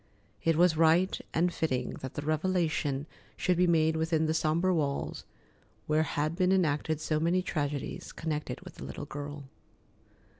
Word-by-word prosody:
It 165 -1 +3
was 175 0 +4
right 165 +4 +4 0.2
and 175 +2 +1
fitting 130 -6 -1
that 130 - -7
the 145 - -3
revelation 155 -3 0 0.3
should 180 - +2
be 180 +1 +3
made 160 -1 +3
within 160 0 +1
the 155 - +1
sombre 160 +4 +2
walls 145 -4 -2 0.6
where 155 +1 +2
had 155 +1 -1
been 185 0 +2
enacted 155 -4 +1
so 155 -1 0
many 175 +3 +2
tragedies 145 -5 -3
connected 155 -2 -4
with - - -12
the - - -8
little - - -6
girl. 145 0 -6
160 Hz, 155 wpm, -30 LUFS, 150-170 Hz, 0.6 s, was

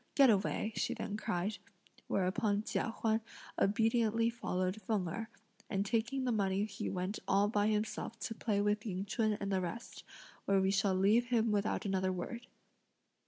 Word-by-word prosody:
Get 270 -4 +7
away," 210 +2 0
she - - -1
then 205 - -4
cried; 205 -2 -2 0.5
whereupon 205 +2 +1
Chia - - -1
Huan 225 0 0 0.4
obediently 225 +2 +2
followed 185 -3 -2
Feng 210 -6 0
Erh, 220 +7 -4 0.4
and 200 -1 0
taking 235 +5 0
the 250 - +1
money 200 -2 +1
he 215 +1 -4
went 185 +3 -3
all 200 +1 +4
by 205 -1 +2
himself 215 +1 -1
to 225 - -3
play 215 -2 -1
with 210 +1 +1
Ying 195 -3 -3
Ch'un 215 +1 +1
and 200 0 -3
the 190 -1 +1
rest; 225 +7 -6 0.4
where 195 -1 +3
we 190 0 +2
shall 195 -1 +2
leave 205 +6 +4
him 230 -2 +2
without 205 +1 0
another 190 -1 +1
word. 235 +7 -5
210 Hz, 165 wpm, -34 LUFS, 195-225 Hz, 0.5 s, Get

